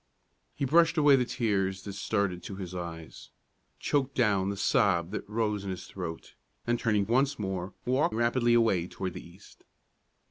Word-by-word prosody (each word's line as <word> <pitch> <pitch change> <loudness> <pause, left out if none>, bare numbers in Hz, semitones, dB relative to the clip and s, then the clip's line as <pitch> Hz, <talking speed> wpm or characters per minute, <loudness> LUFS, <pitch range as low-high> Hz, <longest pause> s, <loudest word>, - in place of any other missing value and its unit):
He 140 - -1
brushed 165 +4 +4
away 145 -2 +6
the 125 -2 +2
tears 95 -6 -1
that 100 - -6
started 100 -3 -1
to 100 - -7
his 95 -2 -7
eyes, 85 -3 -7 0.5
choked 140 -2 -1
down 100 -5 +2
the 100 - -3
sob 95 - +2
that 105 - -5
rose 105 -2 -1
in 100 - -5
his 90 -1 -5
throat, 85 -4 -7 0.3
and 120 0 0
turning 105 -4 +1
once 135 +6 +2
more, 95 -2 -4
walked 130 -2 +1
rapidly 120 +1 +2
away 105 -7 +2
toward 95 -1 -5
the - - -8
east. 90 +4 -17
100 Hz, 170 wpm, -29 LUFS, 95-120 Hz, 0.5 s, away